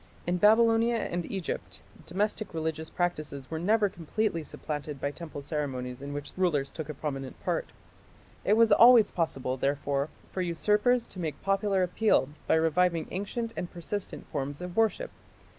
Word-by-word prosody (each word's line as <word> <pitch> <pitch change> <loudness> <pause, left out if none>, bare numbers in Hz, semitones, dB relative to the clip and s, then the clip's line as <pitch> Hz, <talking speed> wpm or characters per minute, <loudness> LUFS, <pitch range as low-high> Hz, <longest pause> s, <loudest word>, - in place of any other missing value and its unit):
In 175 +1 +1
Babylonia 225 +3 +5
and 175 -6 -2
Egypt 190 -5 -4 0.2
domestic 205 +1 -2
religious 160 0 -3
practices 155 -6 -3
were 160 - -2
never 210 +4 +3
completely 175 +1 -2
supplanted 150 -1 -5
by 140 +2 -1
temple 150 -2 -8
ceremonies 135 -4 -3
in 140 0 -6
which 145 0 -6
rulers 160 -7 +1
took 160 -2 -6
a 150 - -4
prominent 135 -2 -5
part. - - -1 0.7
It 205 - +3
was 230 -1 +5
always 235 +1 +8
possible, 135 -6 -1
therefore, 140 +1 0 0.2
for 185 - -2
usurpers 210 +8 +2
to 185 - -10
make 155 -5 -3
popular 195 -1 +2
appeal 180 -5 +2 0.2
by - - +4
reviving 165 +1 +2
ancient 225 +4 -3
and 175 - -4
persistent 185 +3 -5
forms 145 -2 -4
of 180 0 -6
worship. 225 - +1
170 Hz, 155 wpm, -29 LUFS, 145-205 Hz, 0.7 s, always